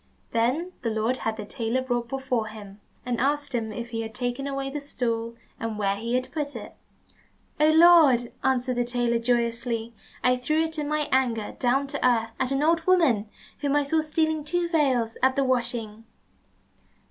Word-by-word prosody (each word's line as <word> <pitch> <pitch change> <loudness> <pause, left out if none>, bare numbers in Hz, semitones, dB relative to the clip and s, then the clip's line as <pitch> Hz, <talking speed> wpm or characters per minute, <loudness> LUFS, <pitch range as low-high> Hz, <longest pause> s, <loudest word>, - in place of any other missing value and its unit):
Then 255 +10 0
the 230 - -1
Lord 220 +3 0
had 225 -2 -3
the 210 - -5
tailor 235 +3 -2
brought 240 -2 -1
before 260 -4 -1
him, 210 -2 -11 0.3
and 245 -1 -1
asked 290 +1 0
him 225 -2 -2
if 235 +2 -6
he 225 -1 -2
had 220 -1 -7
taken 250 +2 -2
away 275 -1 -3
the 295 +1 -4
stool, 230 -4 -3 0.2
and 225 -2 -3
where 200 -1 +1
he 230 +4 -2
had 255 0 -2
put 295 -2 -3
it? - - -8 0.9
"Oh, 305 +1 +5
Lord," 310 -7 +6
answered 255 -1 +1
the 245 - +2
tailor 240 -1 0
joyously, 235 -1 -1 0.3
"I 250 0 +4
threw 305 +6 +1
it 320 -1 -4
in 295 - -2
my 300 0 0
anger 240 -5 0
down 265 +2 +2
to 275 - -4
earth 230 -3 +2
at 260 0 0
an 275 +1 +1
old 330 +1 +3
woman 265 - +3 0.3
whom 285 0 0
I 290 - +3
saw 315 +3 +1
stealing 315 0 0
two 345 +3 -1
veils 260 -9 +1
at 260 0 +3
the 275 - +2
washing." 235 -4 -1
250 Hz, 185 wpm, -26 LUFS, 230-285 Hz, 0.9 s, Lord